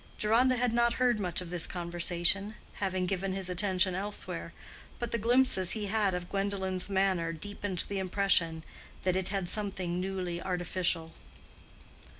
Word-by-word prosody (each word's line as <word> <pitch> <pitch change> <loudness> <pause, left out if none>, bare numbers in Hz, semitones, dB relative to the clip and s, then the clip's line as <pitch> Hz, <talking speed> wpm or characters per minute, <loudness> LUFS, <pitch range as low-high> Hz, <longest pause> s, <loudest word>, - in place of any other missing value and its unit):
Deronda 240 +5 +3
had 245 -1 +1
not 235 0 +3
heard 245 -3 +2
much 180 -3 -1
of 175 -1 -8
this 175 -2 0
conversation, 175 +3 0 0.3
having 185 -2 0
given 190 +1 -1
his 190 -1 -1
attention 185 0 +2
elsewhere, 200 +3 -3 0.5
but 240 -1 -4
the - - +1
glimpses 235 -5 +4
he 215 -2 -2
had 200 -2 +1
of 175 0 -4
Gwendolen's 195 -1 -1
manner 190 -4 +1
deepened 190 +2 -3
the 200 -1 -2
impression 180 -4 +1 0.4
that 185 -1 +1
it 190 -1 -1
had 195 -3 -2
something 190 -4 -2
newly 180 -2 -3
artificial. 175 -2 -1
190 Hz, 150 wpm, -31 LUFS, 180-205 Hz, 0.5 s, glimpses